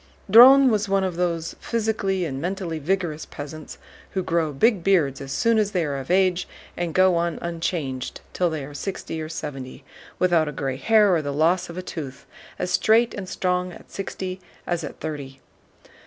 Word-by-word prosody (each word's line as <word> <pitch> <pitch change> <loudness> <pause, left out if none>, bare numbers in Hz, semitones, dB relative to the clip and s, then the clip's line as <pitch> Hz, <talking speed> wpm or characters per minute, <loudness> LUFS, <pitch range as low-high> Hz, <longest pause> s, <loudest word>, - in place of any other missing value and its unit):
Dron 260 +4 +9
was 210 -1 0
one 195 0 +2
of 185 -2 -2
those 170 -2 -2
physically 210 -5 -1
and 135 -3 -4
mentally 175 -2 -3
vigorous 165 -1 -1
peasants 150 +1 -8 0.4
who 190 - -1
grow 165 -2 0
big 190 - +2
beards 160 -9 +2
as 135 0 -7
soon 230 +9 +2
as 210 -1 0
they 175 -3 +1
are 140 -2 -2
of 135 - -9
age 185 -1 +2 0.3
and 175 -2 -3
go 185 0 +5
on 170 0 -1
unchanged 165 -6 -3
till 180 -1 +1
they 155 -4 -4
are 145 - -10
sixty 160 0 -5
or 155 - -5
seventy, 135 -5 -7 0.3
without 175 -4 +3
a - - -2
gray 135 -1 -3
hair 210 +3 +4
or 165 - +2
the 145 -1 -3
loss 170 +6 +1
of 170 - -8
a 185 - -4
tooth, 140 -7 -7 0.3
as 180 - -3
straight 225 +2 +3
and 190 -2 -6
strong 180 -1 -1
at - - -14
sixty 190 -1 -5 0.2
as 175 -2 -2
at 145 - -7
thirty. 140 -3 -6
175 Hz, 185 wpm, -24 LUFS, 150-190 Hz, 0.4 s, Dron